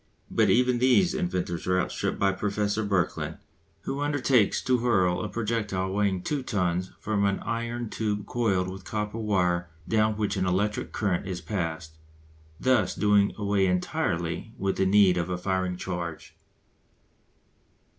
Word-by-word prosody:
But 110 Hz, -3 st, +3 dB
even 125 Hz, +4 st, +3 dB
these 130 Hz, +9 st, +4 dB
inventors 90 Hz, -, -2 dB
are 90 Hz, 0 st, +3 dB
outstripped -, -, -2 dB
by 100 Hz, 0 st, +3 dB
Professor 105 Hz, +2 st, -1 dB
Birkeland, 95 Hz, -4 st, -1 dB, 0.4 s
who 135 Hz, -, -4 dB
undertakes 135 Hz, -6 st, +2 dB
to 125 Hz, -1 st, +2 dB
hurl 95 Hz, -7 st, +2 dB
a 105 Hz, -, -3 dB
projectile 105 Hz, -3 st, -2 dB
weighing 100 Hz, -2 st, 0 dB
two 145 Hz, -2 st, -1 dB
tons 90 Hz, -6 st, -1 dB
from 105 Hz, -2 st, 0 dB
an 100 Hz, -1 st, +2 dB
iron 115 Hz, +1 st, -3 dB
tube 105 Hz, -1 st, -2 dB
coiled 100 Hz, -7 st, 0 dB
with 95 Hz, 0 st, -7 dB
copper 105 Hz, +3 st, -3 dB
wire 90 Hz, -5 st, +1 dB, 0.2 s
down 110 Hz, -1 st, +2 dB
which 105 Hz, -1 st, -1 dB
an 95 Hz, -1 st, 0 dB
electric 100 Hz, +4 st, 0 dB
current 95 Hz, -3 st, -1 dB
is 90 Hz, -2 st, -3 dB
passed; 80 Hz, -5 st, -4 dB, 0.6 s
thus 130 Hz, -1 st, +2 dB
doing 105 Hz, -1 st, +3 dB
away 100 Hz, -2 st, +1 dB
entirely 90 Hz, +2 st, -1 dB
with 95 Hz, 0 st, -1 dB
the 95 Hz, -, +2 dB
need 95 Hz, -2 st, +5 dB
of 85 Hz, 0 st, -1 dB
a 90 Hz, -, -1 dB
firing 95 Hz, 0 st, -1 dB
charge. 85 Hz, -3 st, -5 dB
100 Hz, 145 wpm, -27 LUFS, 90-110 Hz, 0.6 s, need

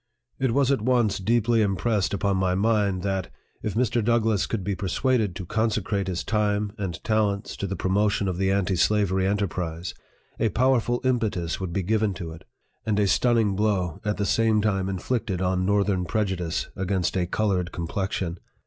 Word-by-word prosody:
It 130 Hz, -3 st, +1 dB
was 140 Hz, -1 st, +3 dB
at 135 Hz, -, +1 dB
once 120 Hz, -4 st, +2 dB
deeply 115 Hz, +3 st, +2 dB
impressed 105 Hz, 0 st, +1 dB
upon 100 Hz, -1 st, 0 dB
my 95 Hz, -1 st, +1 dB
mind, 100 Hz, -3 st, +1 dB
that, 95 Hz, -2 st, -2 dB, 0.3 s
if 105 Hz, -, -3 dB
Mr. 120 Hz, -1 st, +1 dB
DOUGLASS 110 Hz, -3 st, +2 dB
could 110 Hz, -5 st, -2 dB
be 100 Hz, +2 st, -1 dB
persuaded 105 Hz, +1 st, 0 dB
to 90 Hz, 0 st, -6 dB
consecrate 105 Hz, -1 st, -1 dB
his 90 Hz, -2 st, -2 dB
time 105 Hz, -1 st, 0 dB
and 90 Hz, -5 st, -4 dB
talents 105 Hz, -2 st, 0 dB
to 100 Hz, -, -3 dB
the 100 Hz, -, -3 dB
promotion 100 Hz, +1 st, +1 dB
of 90 Hz, -2 st, -2 dB
the 95 Hz, 0 st, +2 dB
anti 95 Hz, -1 st, +1 dB
slavery 95 Hz, 0 st, +2 dB
enterprise, 90 Hz, -4 st, -2 dB, 0.5 s
a 115 Hz, -, +2 dB
powerful 120 Hz, +2 st, +2 dB
impetus 110 Hz, -10 st, 0 dB
would 95 Hz, -2 st, -4 dB
be 95 Hz, +2 st, -1 dB
given 105 Hz, 0 st, +1 dB
to 85 Hz, -2 st, -6 dB
it, 80 Hz, -, -12 dB, 0.4 s
and 105 Hz, -1 st, 0 dB
a 105 Hz, -, +3 dB
stunning 115 Hz, -2 st, +2 dB
blow 95 Hz, -5 st, 0 dB
at 105 Hz, 0 st, -1 dB
the 100 Hz, -, 0 dB
same 110 Hz, +1 st, +3 dB
time 95 Hz, -3 st, 0 dB
inflicted 95 Hz, 0 st, -2 dB
on 90 Hz, 0 st, 0 dB
northern 100 Hz, -2 st, +1 dB
prejudice 95 Hz, -6 st, -1 dB
against 95 Hz, -2 st, -1 dB
a 90 Hz, -2 st, 0 dB
colored 90 Hz, -3 st, 0 dB
complexion. 90 Hz, 0 st, -3 dB
100 Hz, 175 wpm, -25 LUFS, 95-110 Hz, 0.5 s, was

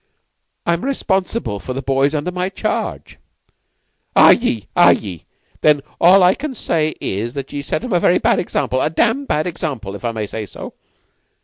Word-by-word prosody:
"I'm 170 Hz, +4 st, 0 dB
responsible 195 Hz, -, -1 dB
for 130 Hz, -, -6 dB
the 135 Hz, -, -4 dB
boys 135 Hz, +3 st, +1 dB
under 150 Hz, +5 st, -2 dB
my 180 Hz, +1 st, -2 dB
charge." -, -, -4 dB, 1.0 s
"Ye 115 Hz, -, +5 dB
are, -, -, +6 dB
are -, -, +8 dB
ye? 90 Hz, -5 st, -6 dB, 0.4 s
Then 150 Hz, -2 st, +4 dB, 0.2 s
all 185 Hz, +2 st, +6 dB
I 180 Hz, +1 st, +6 dB
can 280 Hz, +1 st, -6 dB
say 155 Hz, -7 st, -1 dB
is 115 Hz, +6 st, -3 dB
that 135 Hz, -1 st, -6 dB
ye 145 Hz, -, -3 dB
set 145 Hz, -, -3 dB
them 250 Hz, -5 st, -3 dB
a 175 Hz, -, +3 dB
very 175 Hz, -, +3 dB
bad -, -, +2 dB
example 130 Hz, -6 st, -1 dB
a -, -, +1 dB
dam' 235 Hz, -, +1 dB
bad 155 Hz, -, 0 dB
example, 145 Hz, -, -4 dB
if 100 Hz, -, -9 dB
I 120 Hz, -, -1 dB
may 110 Hz, -2 st, -3 dB
say 105 Hz, +1 st, -6 dB
so. -, -, -9 dB
155 Hz, 185 wpm, -18 LUFS, 125-185 Hz, 1.0 s, are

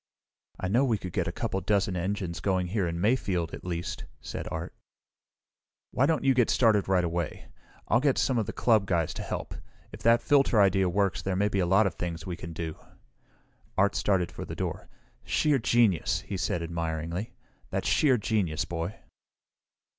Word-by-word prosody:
"I 95 Hz, -, -2 dB
know 115 Hz, +8 st, +3 dB
we 120 Hz, -5 st, +2 dB
could 90 Hz, -3 st, -7 dB
get -, -, 0 dB
a -, -, -1 dB
couple 95 Hz, -, -2 dB
of 90 Hz, -, -14 dB
dozen 100 Hz, -3 st, +2 dB
engines 90 Hz, -1 st, -2 dB
going 95 Hz, -2 st, 0 dB
here 100 Hz, -2 st, 0 dB
in 85 Hz, 0 st, -3 dB
Mayfield, 95 Hz, -6 st, 0 dB
at -, -, -7 dB
least!" 85 Hz, -1 st, -4 dB
said -, -, -6 dB
Art. 80 Hz, +1 st, -5 dB, 1.2 s
"Why 135 Hz, -, +2 dB
don't 160 Hz, -1 st, +1 dB
you 135 Hz, -1 st, +4 dB
get 125 Hz, -2 st, +3 dB
started 110 Hz, -5 st, +3 dB
right 95 Hz, -2 st, +3 dB
away? 85 Hz, -1 st, -3 dB, 0.5 s
Get 140 Hz, -2 st, +2 dB
some 130 Hz, -3 st, +2 dB
of 110 Hz, -, -2 dB
the -, -, -2 dB
club 110 Hz, -5 st, +2 dB
guys 85 Hz, -5 st, 0 dB
to -, -, -6 dB
help. -, -, -5 dB, 0.4 s
If -, -, -10 dB
that 115 Hz, +1 st, +4 dB
filter 140 Hz, -6 st, +4 dB
idea 95 Hz, -2 st, +4 dB
works 95 Hz, -2 st, 0 dB
there 95 Hz, +1 st, -2 dB
may 100 Hz, +2 st, +2 dB
be 100 Hz, -, -1 dB
a 90 Hz, -, +1 dB
lot 95 Hz, +4 st, +4 dB
of 95 Hz, -, 0 dB
things 85 Hz, -2 st, -5 dB
we 90 Hz, -, -4 dB
can 85 Hz, 0 st, -8 dB
do." 80 Hz, -1 st, -5 dB, 1.0 s
Art 100 Hz, +1 st, +3 dB
started 95 Hz, -4 st, +1 dB
for -, -, -7 dB
the -, -, -6 dB
door. -, -, -4 dB, 0.3 s
"Sheer 150 Hz, -3 st, +2 dB
genius," 115 Hz, -6 st, +2 dB
he 100 Hz, -, -6 dB
said 85 Hz, -1 st, -1 dB
admiringly. 85 Hz, +3 st, -3 dB, 0.3 s
"That's -, -, -2 dB
sheer 135 Hz, -5 st, +4 dB
genius, 95 Hz, -8 st, 0 dB
Boy!" 85 Hz, +4 st, -4 dB
95 Hz, 185 wpm, -28 LUFS, 85-110 Hz, 1.2 s, you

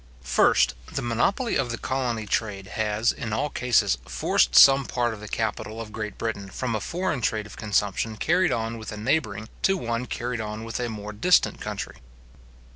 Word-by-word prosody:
First, 65 Hz, 0 st, +4 dB, 0.2 s
The -, -, -3 dB
monopoly 155 Hz, -, +1 dB
of 130 Hz, -3 st, 0 dB
the 115 Hz, -, -3 dB
colony 125 Hz, -4 st, -2 dB
trade 100 Hz, -2 st, -2 dB
has, 110 Hz, +3 st, +1 dB
in 110 Hz, -3 st, -5 dB
all 140 Hz, +6 st, -1 dB
cases, 120 Hz, -, +2 dB
forced -, -, +1 dB
some 135 Hz, 0 st, +8 dB
part 120 Hz, -2 st, 0 dB
of 110 Hz, -, -9 dB
the 105 Hz, -, -9 dB
capital 110 Hz, 0 st, -3 dB
of 110 Hz, -2 st, -7 dB
Great 105 Hz, -2 st, -5 dB
Britain 100 Hz, -4 st, -3 dB
from 125 Hz, +3 st, -3 dB
a 110 Hz, -, 0 dB
foreign 175 Hz, -, -2 dB
trade 110 Hz, -2 st, 0 dB
of 105 Hz, -, -11 dB
consumption 105 Hz, +1 st, -1 dB
carried 175 Hz, -, +2 dB
on 115 Hz, -1 st, -2 dB
with 110 Hz, -, -7 dB
a 105 Hz, -, -6 dB
neighbouring, 110 Hz, -3 st, -1 dB
to 195 Hz, 0 st, +3 dB
one 120 Hz, -4 st, -2 dB
carried 120 Hz, 0 st, -3 dB
on 105 Hz, +1 st, -5 dB
with 115 Hz, +1 st, -4 dB
a 120 Hz, -1 st, -1 dB
more 105 Hz, -1 st, -6 dB
distant 160 Hz, -, +3 dB
country. -, -, -5 dB
115 Hz, 190 wpm, -25 LUFS, 105-125 Hz, 0.2 s, some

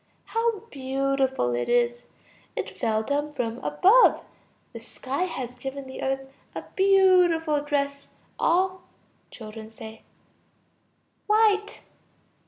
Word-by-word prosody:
How 455 Hz, -3 st, -1 dB
beautiful 265 Hz, -, 0 dB
it 120 Hz, 0 st, -2 dB
is! 240 Hz, 0 st, +1 dB, 0.5 s
It -, -, -3 dB
fell 220 Hz, -2 st, -1 dB
down 290 Hz, +4 st, -2 dB
from 240 Hz, -3 st, -3 dB
above. 380 Hz, -, +4 dB, 0.5 s
The 230 Hz, -, -7 dB
sky 265 Hz, +7 st, -4 dB
has 255 Hz, -8 st, -5 dB
given 270 Hz, +2 st, -6 dB
the 265 Hz, -, -8 dB
earth 270 Hz, 0 st, -2 dB, 0.3 s
a -, -, -5 dB
beautiful 360 Hz, -6 st, +4 dB
dress, 280 Hz, -1 st, -2 dB, 0.3 s
all... 370 Hz, +2 st, +1 dB, 0.5 s
Children. 220 Hz, -1 st, -10 dB, 1.6 s
White. 420 Hz, -1 st, +2 dB
280 Hz, 100 wpm, -25 LUFS, 245-365 Hz, 1.6 s, above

